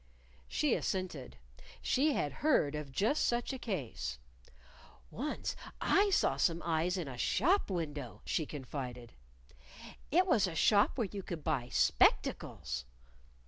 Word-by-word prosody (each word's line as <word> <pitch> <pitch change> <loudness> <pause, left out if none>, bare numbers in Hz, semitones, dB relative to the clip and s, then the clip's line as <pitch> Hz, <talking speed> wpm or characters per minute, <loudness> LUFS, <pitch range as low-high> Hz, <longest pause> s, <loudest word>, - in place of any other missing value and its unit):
She - - +1
assented. 160 - -3 0.4
She 290 +3 +2
had 145 - -1
heard 265 - +3
of 150 -2 -5
just 220 - +1
such 240 +2 0
a 265 - -5
case. 115 - -4 0.9
"Once 290 +6 -3 0.2
I 405 +1 +3
saw 385 - +2
some 170 -2 +1
eyes 170 +3 +1
in 170 -5 -3
a 125 -2 -7
shop 345 - +2
window," 145 - -4
she 155 - -1
confided. 125 -4 -6 1.0
"It 360 +5 +4
was 230 - +3
a 170 - -5
shop 205 +7 +4
where 235 - +1
you 200 - -4
could 170 -4 -6
buy 135 -6 -1
spectacles." 60 - +1
165 Hz, 135 wpm, -33 LUFS, -, 1.0 s, It